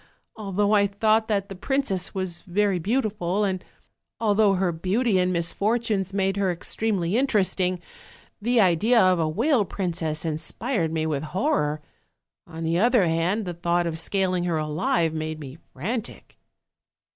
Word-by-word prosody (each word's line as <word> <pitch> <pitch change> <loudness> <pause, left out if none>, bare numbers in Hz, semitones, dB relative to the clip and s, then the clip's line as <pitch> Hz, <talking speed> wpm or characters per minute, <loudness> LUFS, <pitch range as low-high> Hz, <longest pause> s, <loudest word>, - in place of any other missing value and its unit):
Although 205 -1 -1
I 200 -1 +4
thought 215 +2 +2
that 200 -2 0
the 195 - -7
princess 195 -3 -1
was 185 -3 -4
very 195 0 0
beautiful, 210 -2 -1
and 190 -2 -1 0.6
although 210 -2 +3
her 185 -1 +1
beauty 190 +5 +1
and 180 0 +1
misfortunes 200 +3 0
made 195 0 0
her 195 -2 +1
extremely 185 +1 -1
interesting, 195 -8 +1 0.6
the 240 +3 +2
idea 210 +5 +4
of 185 -3 +4
a 160 -1 +1
whale 235 - +2
princess 165 -4 -2
inspired 165 - -2
me 160 -1 -1
with 150 -3 -1
horror; 155 - -1 0.7
on 165 -1 -7
the 165 +2 +1
other 240 -2 +4
hand, 170 +6 0
the 175 - -4
thought 175 0 0
of 165 -1 -2
scaling 185 0 0
her 170 -2 0
alive 155 +2 0
made 155 0 -4
me 145 +1 -9
frantic. 220 - -5
185 Hz, 145 wpm, -24 LUFS, 170-210 Hz, 0.7 s, I